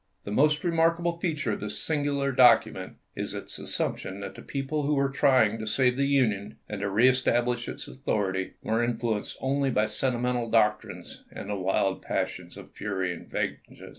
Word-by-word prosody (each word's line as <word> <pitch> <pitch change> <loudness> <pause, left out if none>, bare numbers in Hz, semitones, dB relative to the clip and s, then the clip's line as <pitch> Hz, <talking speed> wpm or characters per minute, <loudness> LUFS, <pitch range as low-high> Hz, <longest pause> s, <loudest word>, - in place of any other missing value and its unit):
The 100 - -6
most 150 +6 +3
re 175 - +1
markable 170 +1 +1
feature 155 - -1
of 105 - -3
this 105 0 -4
singular 145 -3 0
document 115 -7 +4 0.2
is - - -4
its - - -7
assumption 95 +1 -3
that 95 -1 -6
the - - -11
people 140 +2 -3
who 145 +1 +1
were 140 0 +1
trying 125 -5 +3
to 110 - -5
save 125 +2 +2
the 140 +1 +1
Union 115 -8 +1
and 105 -2 -5
to 100 - -1
reestablish 120 +2 +2
its - - -7
authority 100 -8 -2
were 115 +2 +1
influenced 115 -3 -2
only 135 +1 +1
by 110 -4 +2
sentimental 120 +1 0
doctrines 110 -2 0
and 105 - -7
the - - -1
wild 95 0 0
passions - - -3
of - - -12
fury 95 -3 -2
and 85 - -11
vengeance. - - -4
120 Hz, 175 wpm, -27 LUFS, 105-140 Hz, 0.2 s, document